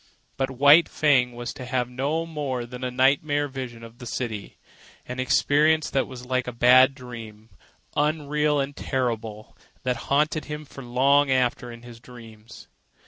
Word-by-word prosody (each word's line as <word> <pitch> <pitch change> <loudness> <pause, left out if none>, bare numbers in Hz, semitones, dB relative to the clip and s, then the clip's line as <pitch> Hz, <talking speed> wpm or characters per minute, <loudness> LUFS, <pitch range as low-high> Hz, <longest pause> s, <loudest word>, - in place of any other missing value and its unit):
But 135 0 -1
White 145 +5 +6
Fang 130 -5 +2
was 120 0 -6
to - - -9
have 125 -1 -1
no 140 +6 -2
more 140 -6 -4
than 125 +1 -9
a 125 - -1
nightmare 145 +3 +2
vision 130 -4 -7
of 115 +1 -13
the 125 - -8
city—an 115 +2 -8
experience 150 +4 +2
that 135 - 0
was 125 -1 -10
like 130 0 -1
a - - -3
bad 130 +3 +5
dream, 115 -4 -10 0.5
unreal 150 0 +1
and 140 +1 -3
terrible, 115 -6 -3 0.3
that 125 -1 -1
haunted 150 +2 +1
him 150 0 -6
for 135 -1 -11
long 135 +4 +3
after 125 -2 0
in 115 0 -12
his 120 -1 -12
dreams. 115 -2 -14
130 Hz, 155 wpm, -24 LUFS, 120-145 Hz, 0.5 s, White